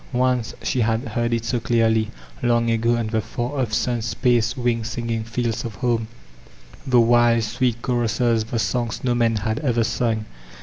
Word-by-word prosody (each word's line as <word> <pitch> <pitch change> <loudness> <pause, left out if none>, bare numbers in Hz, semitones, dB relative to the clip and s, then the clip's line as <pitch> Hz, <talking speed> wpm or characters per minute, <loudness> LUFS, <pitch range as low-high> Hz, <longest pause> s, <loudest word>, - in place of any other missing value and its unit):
Once 125 -2 +1
she 125 - 0
had 115 +2 0
heard 120 +2 -1
it 115 -1 -1
so 120 +1 0
clearly, 115 -1 +2 0.2
— - - -22
^kmg 120 -1 +2
ago, 115 +1 +2
on 115 - -1
the 110 0 -1
far 120 +5 -4
off 120 -4 -2
sun 120 +1 0
spaced, 120 +2 +1
wind 120 -2 0
singing 115 -1 -3
fields 115 0 -2
of 115 -3 -6
home,— 115 0 0 0.8
the 125 -2 +5
wild, 120 0 +4
sweet 120 +1 0
choruses, 120 -2 +1
the 115 - -3
soQgs 120 0 -1
no 125 -2 +2
man 115 -1 +2
had 110 +1 -1
ever 120 -6 +1
sung. 110 -1 -1
115 Hz, 180 wpm, -22 LUFS, 115-120 Hz, 0.8 s, the